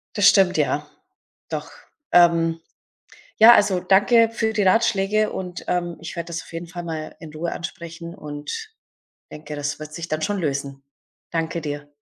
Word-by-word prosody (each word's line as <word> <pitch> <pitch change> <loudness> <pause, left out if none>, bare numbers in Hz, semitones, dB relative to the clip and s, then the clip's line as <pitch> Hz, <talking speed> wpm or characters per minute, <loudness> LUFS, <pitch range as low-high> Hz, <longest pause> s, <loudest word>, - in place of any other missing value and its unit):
Das 205 -2 +6
stimmt, 190 -2 +5
ja. 150 -1 0 0.6
Doch. - - -5 0.4
Ähm, 165 -1 +4 0.8
ja, 230 +2 +10
also, 205 -5 +3
danke 205 +5 +4
für 225 -1 0
die 210 - +1
Ratschläge 210 +1 +2
und, 180 -1 -6
ähm, 175 -1 -1
ich 165 - -7
werde 170 -1 -4
das 170 -1 -4
auf - - -15
jeden 165 +1 -5
Fall 175 +1 -7
mal 160 -2 -5
in 160 -3 -11
Ruhe 170 +2 -3
ansprechen 170 -1 -7
und 150 - -7 0.6
denke, 150 0 -8
das 145 0 -3
wird 155 0 -9
sich 170 +1 -5
dann 155 0 -2
schon 205 -1 -1
lösen. 140 -3 -3 0.5
Danke 165 0 -2
dir. 145 -1 -5
170 Hz, 165 wpm, -23 LUFS, 155-195 Hz, 0.8 s, ja